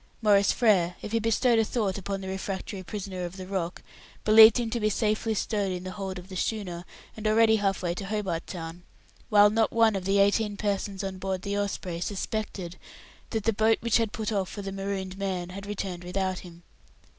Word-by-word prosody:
Maurice 200 -2 +5
Frere, 185 -7 +3
if 210 - -5
he 230 - +2
bestowed 225 +1 +3
a - - +4
thought 210 -4 -1
upon 195 0 -4
the 190 - -6
refractory 190 0 -4
prisoner 185 -1 -5
of 175 +2 -6
the 185 - -6
Rock, 185 -2 -3 0.4
believed 220 +1 +9
him 230 -2 -2
to 235 - -1
be 215 -1 +2
safely 215 +1 0
stowed 205 -2 -1
in 180 0 -4
the 185 - -5
hold 190 -1 -5
of 180 0 -9
the 190 - -9
schooner, 185 -3 -3 0.3
and 220 0 -3
already 220 0 +5
half 195 -2 0
way 175 -1 0
to 195 +3 -6
Hobart 195 -5 -2
Town; 165 0 -7 0.5
while 205 -1 +6
not 225 0 +2
one 225 -2 +4
of 190 -2 -3
the 195 +1 +2
eighteen 205 +1 +2
persons 200 -1 -2
on 190 -1 -4
board 190 -1 -3
the 200 0 -2
Osprey 190 -4 -2
suspected 195 -2 -4 0.5
that 220 -3 -2
the 225 - +2
boat 220 +2 +3
which 235 -2 +3
had 225 -3 0
put 220 -1 -3
off 195 -3 -1
for 205 - -7
the 195 - -4
marooned 195 -1 -4
man 185 -3 -2
had 195 +2 -8
returned 190 -3 -4
without 185 +1 -2
him. 170 -1 -13
200 Hz, 210 wpm, -27 LUFS, 185-215 Hz, 0.5 s, believed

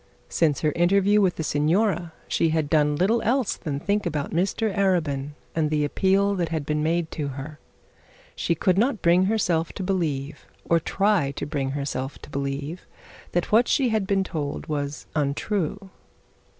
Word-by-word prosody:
Since 150 -5 +1
her 155 - +2
interview 200 +5 +3
with 185 -3 +2
the 160 - -3
signora 170 +4 +1 0.2
she 165 - +1
had 155 -2 0
done 150 -2 +3
little 205 +9 +2
else 250 -1 +1
than 145 -5 -4
think 205 +3 0
about 150 -4 -3
Mr 195 +4 0
Arabin, 155 -8 0 0.2
and 155 -2 +1
the 150 -1 +1
appeal 195 +5 +2
that 175 -4 -1
had 160 -3 -2
been 150 0 0
made 165 +1 0
to 150 -3 -3
her. 140 +3 -7 0.8
She 170 - 0
could 185 +3 +2
not 235 -2 +1
bring 175 +2 +5
herself 180 -6 0
to 195 - -5
believe 160 -7 -2 0.2
or 170 - +3
try 195 -3 +1
to - - -4
bring 140 -3 -2
herself 140 -1 -3
to - - -11
believe, 140 +4 -4 0.5
that 175 - 0
what 230 +3 +5
she 260 -3 +2
had 215 -3 0
been 195 -1 +2
told 150 -6 -4
was 145 -1 -3
untrue. 185 +6 -1
165 Hz, 170 wpm, -25 LUFS, 150-195 Hz, 0.8 s, bring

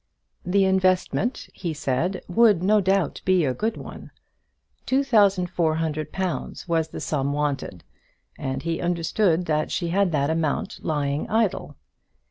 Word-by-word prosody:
The 195 +2 +2
investment, 190 +5 +1
he 170 -4 -4
said, 155 +6 -1
would, 205 -2 +4
no 210 +2 +4
doubt, 190 -4 0
be 185 -4 +3
a 130 - 0
good 220 - -2
one. - - -9 0.8
Two 270 +2 +2
thousand 200 -8 +3
four 160 -3 +1
hundred 155 -1 -2
pounds 185 -1 -4
was 165 -2 +1
the - - -8
sum 140 -2 -1
wanted, 140 - -2 0.5
and 135 -1 -4
he 165 0 -2
understood 175 +1 +1
that 155 -1 0
she 170 -2 -2
had 190 +1 +2
that 145 -1 +1
amount 160 -3 -1
lying 145 -2 -1
idle. 210 -9 0
170 Hz, 145 wpm, -24 LUFS, 155-190 Hz, 0.8 s, would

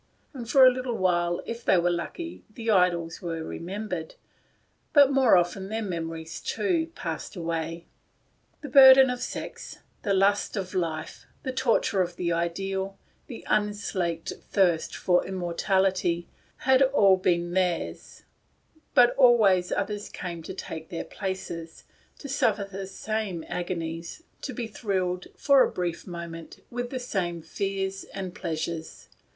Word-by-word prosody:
And 240 -5 -7
for 265 +1 +7
a 255 - +8
little 250 -2 -3
while, 175 -2 +1
if 235 +1 -6
they 190 - +4
were 175 0 +2
lucky, 330 - -5
the 225 +1 -2
idols 175 -4 +2
were 165 -3 -4
remembered, 180 0 -5 0.8
but 285 -2 +7
more 265 -7 +5
often 185 +2 -1
their 220 +1 -2
memories 165 -3 -5 0.5
passed - - -5
away. 165 -1 -3 0.8
The 290 - -7
burden 265 -1 +9
of 250 0 -4
sex, - - -6 0.2
the 200 -2 +1
lust 200 +2 +2
of 185 -2 -4
life, 160 -4 -3 0.2
the 260 - -2
tor 255 -2 +2
ture 195 - 0
of 175 -1 -2
the 170 -1 -1
ideal, 190 +3 -2 0.3
the 245 - -9
unslaked 200 -5 -1 0.2
thirst 180 -5 +2
for 180 -1 +2
im 190 - -4
mortality, 180 -1 0 0.4
had 265 0 +5
all 235 -8 +5
been 175 -2 0
theirs; 180 -2 -2 0.7
but 245 -1 +7
always 215 -9 +5
others 205 -1 -2
came 175 -3 -6
to 160 - -7
take 160 -4 -7
their 170 - -4
places, 170 -4 -6 0.3
to 285 - -8
suffer 220 -6 +1
the 195 -1 -6
same 195 -3 -3
agonies, 170 - -4 0.2
to 280 - -4
be 245 -2 -4
thrilled, 185 -5 -2
for 280 -2 +5
a - - +4
brief 175 -1 -3
mo 170 -1 -6
ment, 165 0 -10
with 245 0 -3
the 260 - -4
same 175 -9 -3
fears 195 0 -3
and 190 -2 -5
pleasures. 165 -3 -5
190 Hz, 145 wpm, -27 LUFS, 170-220 Hz, 0.8 s, burden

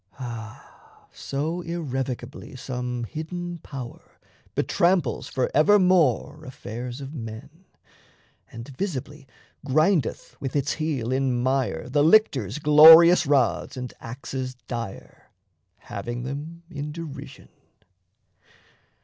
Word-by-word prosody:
Ah, 115 -4 -10
so 155 +6 -3
irrevocably 135 -9 -5
some 125 -2 -4
hidden 175 - -6
power 130 -5 -10 0.4
Betramples 170 - +1
forevermore 155 - +3
affairs 125 -1 -7
of 135 +2 -8
men, 140 - -9 0.9
And 115 +3 -9
visibly 145 -5 -5 0.4
grindeth 155 +4 +1
with 135 0 -4
its 140 0 +1
heel 145 -7 -2
in 130 -2 +1
mire 130 -8 0
The 145 +3 +2
lictors' 150 - +3
glorious 160 +3 +8
rods 135 -2 +1
and 125 -1 -6
axes 130 +2 -6
dire, 115 -5 -7 0.5
Having 120 +4 -6
them 150 +6 -6
in 150 0 -5
derision! 160 -2 -9
140 Hz, 95 wpm, -25 LUFS, 125-160 Hz, 0.9 s, glorious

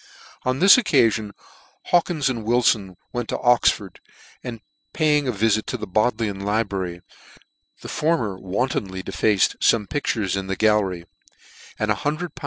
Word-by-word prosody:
On 130 0 0
this 195 - +7
occafion 115 - +2 0.6
Hawkins 170 -5 +2
and 120 -4 -2
Wilfon 110 -5 +1 0.2
went 120 -2 -3
to - - -1
Oxford, 115 -6 +2 0.4
and 115 -2 -6 0.3
paying 150 -2 +2
a - - +1
vifit 110 0 0
to 125 - -3
the 105 - -6
Bodleian 110 0 -1
libra 105 -1 -1
ry, 85 - -15 0.8
the - - -8
former 150 - 0
wantonly 95 -2 -3
defaced 105 -1 +1
fome 105 -3 +2
pictures 110 -10 -1
in 95 -1 -4
the 95 - -2
gallery; 100 -5 +1 0.7
and 105 0 0
lool. 155 +4 -2
110 Hz, 140 wpm, -22 LUFS, 100-130 Hz, 0.8 s, this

